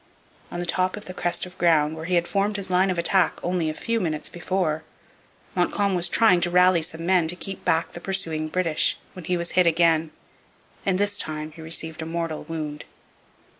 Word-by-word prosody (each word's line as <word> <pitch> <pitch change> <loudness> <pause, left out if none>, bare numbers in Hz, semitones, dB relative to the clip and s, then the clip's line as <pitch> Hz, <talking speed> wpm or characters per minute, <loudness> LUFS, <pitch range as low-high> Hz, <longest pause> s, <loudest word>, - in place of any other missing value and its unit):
On 175 - -5
the 175 - -2
top 185 +3 +1
of 210 - -9
the 185 - -7
crest 175 -1 -1
of 180 0 -12
ground, 160 -3 +3
where 160 0 -7
he 180 +1 0
had 170 0 +2
formed 205 +1 0
his 190 -2 -5
line 185 +2 +3
of 185 - -1
attack 180 +2 +2
only 175 -3 0
a 155 - -4
few 230 +6 -1
minutes 155 -6 -2
before, 175 -3 -1 0.7
Montcalm 195 +2 +1
was 175 -1 +2
trying 200 -5 +4
to 175 - +2
rally 180 -1 +5
some 160 +1 -5
men 180 -2 +3
to 175 - +2
keep 195 +1 -7
back 165 +1 +1
the 175 - -9
pursuing 165 -5 -1
British 165 -1 +1 0.2
when 180 -3 -9
he 180 +1 0
was 170 0 -3
hit 180 -1 +4
again, 165 -1 +3 0.8
and 190 -1 +3
this 205 +1 0
time 155 0 -3
he 160 - -12
received 160 0 -4
a 160 - -5
mortal 165 -2 -3
wound. 155 -2 -5
175 Hz, 205 wpm, -24 LUFS, 160-185 Hz, 0.8 s, rally